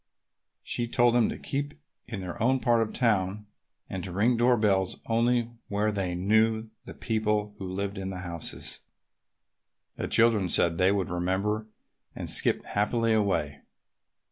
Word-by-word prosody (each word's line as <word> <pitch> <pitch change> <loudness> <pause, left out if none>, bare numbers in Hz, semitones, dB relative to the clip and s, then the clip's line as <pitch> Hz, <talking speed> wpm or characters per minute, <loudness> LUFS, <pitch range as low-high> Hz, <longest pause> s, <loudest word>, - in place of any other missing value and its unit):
She 120 - -2
told 120 0 +3
them 120 -2 +3
to - - -4
keep 145 +1 -4 0.3
in 110 -5 -5
their 90 +5 -6
own 130 +3 +3
part 120 -2 +3
of 110 - -1
town 105 -4 0 0.4
and 95 -2 -5
to 95 - -5
ring 110 +7 +2
door 120 +1 +3
bells 95 -3 +1
only 120 +1 +1 0.2
where 105 +1 0
they 95 -4 -2
knew 110 +4 +2
the - - -9
people 105 -2 -1
who 95 -2 -5
lived 100 +1 -3
in 95 0 -4
the 90 -1 -5
houses. 85 -3 -6 1.2
The - - -3
children 115 -5 +3
said 85 -1 +3
they 95 +1 +4
would 100 -3 -1
remember 95 +5 -1 0.5
and - - -4
skipped - - +2
happily 115 +2 +1
away. 95 -9 0
105 Hz, 155 wpm, -28 LUFS, 95-115 Hz, 1.2 s, they